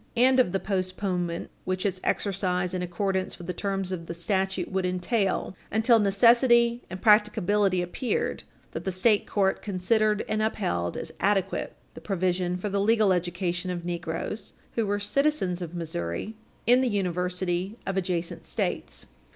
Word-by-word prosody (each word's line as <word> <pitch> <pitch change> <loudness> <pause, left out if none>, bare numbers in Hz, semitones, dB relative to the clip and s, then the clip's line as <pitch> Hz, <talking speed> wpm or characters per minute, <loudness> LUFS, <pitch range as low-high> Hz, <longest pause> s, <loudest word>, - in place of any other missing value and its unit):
348 245 +2 +5
and 260 - +3
of 245 -8 +4
the 195 - 0
postponement 185 -3 -2
which 185 +1 -2
its 185 -2 -1
exercise 180 -2 0
in 185 - -1
accordance 190 +2 -1
with 175 - -9
the 180 - -3
terms 195 -2 -2
of 165 -3 -5
the 170 - -5
statute 190 +1 -1
would 190 0 0
entail 185 +2 0 0.2
until 225 +2 +4
necessity 235 +3 +4
and 185 +1 -7
practicability 210 -3 +4
appeared, 230 +8 -2 0.3
that - - -5
the 190 - -1
state 205 +3 +2
court 195 -2 +1
considered 210 +2 +1
and 215 0 0
upheld 85 - -1
as - - -6
adequate 195 -1 0 0.2
the - - -11
provision 180 -2 0
for 185 - -4
the 200 0 0
legal 215 -2 +4
education 175 0 -2
of 175 -1 -4
negroes, 175 +4 -4 0.2
who 225 -3 0
were 205 +1 +1
citizens 205 -4 0
of 175 0 -6
Missouri, 160 - -4 0.3
in 245 +2 +6
the 255 - +2
universities 180 0 -1
of 195 - -2
adjacent 175 -3 -2
States. - - -3
190 Hz, 160 wpm, -27 LUFS, 180-210 Hz, 0.3 s, in